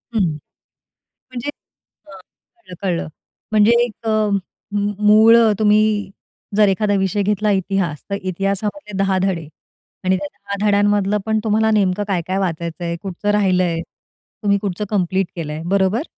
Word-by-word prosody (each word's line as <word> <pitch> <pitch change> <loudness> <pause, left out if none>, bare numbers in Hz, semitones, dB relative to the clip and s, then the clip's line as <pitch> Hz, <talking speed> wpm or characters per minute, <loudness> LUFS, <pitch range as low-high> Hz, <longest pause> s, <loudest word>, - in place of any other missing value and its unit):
हं. 220 - +3 1.1
म्हणजे. 255 +2 -5 0.6
अ, - - -15 0.5
कळलं, 350 - -14
कळलं. 180 -4 -1 0.4
म्हणजे 215 +1 +5
एक 230 -1 -9
अ, - - +2 0.6
म 205 0 0 0.2
मूळ 220 +2 +7 0.2
तुम्ही 210 0 +4 0.8
जर 210 -1 +6
एखादा 205 +2 +1
विषय 195 +2 0
घेतला 210 +1 +1
इतिहास. 190 -5 -1
तर 200 - -1
इतिहासामधले 195 - -3
10 195 -1 +1
धडे 175 -5 -1 0.6
आणि 185 0 +3
त्या 195 +1 -4
10 200 0 -5
धड्यांमधलं 205 0 +2
पण 220 0 +1
तुम्हाला 220 0 +2
नेमकं 205 -2 +2
काय-काय 185 -1 -1
वाचायचंय, 170 -1 -3
कुठचं 195 +1 -4
राहिलंय? 185 -5 +1 0.6
तुम्ही 200 -1 +3
कुठचं 200 0 -3
कंप्लीट 190 -2 0
केलंय, 155 -2 -5
बरोबर? 195 - +1
200 Hz, 135 wpm, -19 LUFS, 185-210 Hz, 1.1 s, मूळ